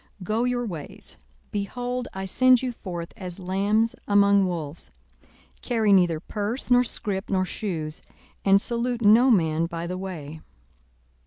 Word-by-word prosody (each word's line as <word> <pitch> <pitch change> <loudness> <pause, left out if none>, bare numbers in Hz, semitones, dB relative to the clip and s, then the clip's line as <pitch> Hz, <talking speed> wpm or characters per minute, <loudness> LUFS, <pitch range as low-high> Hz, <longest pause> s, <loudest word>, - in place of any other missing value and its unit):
42:010:003 - - -9
Go 215 +5 0
your 245 -1 -1
ways: 165 -9 -8 0.3
behold, 245 +5 -3
I 190 0 -5
send 255 +6 +4
you 255 - -1
forth 175 -7 -7
as 180 -4 -7
lambs 200 +4 +1
among 200 -1 +4
wolves. 165 -3 -5 0.7
42:010:004 - - -30
Carry 225 -4 +2
neither 175 -4 +3
purse, 215 +8 -4
nor 245 0 +6
scrip, 200 -4 -3
nor 185 -1 +1
shoes: 165 -6 -4 0.4
and 195 0 +5
salute 235 +2 -2
no 225 +5 +6
man 165 -6 +2
by 170 0 -5
the 180 +1 -4
way. 160 -5 -7
200 Hz, 150 wpm, -25 LUFS, 175-230 Hz, 0.7 s, nor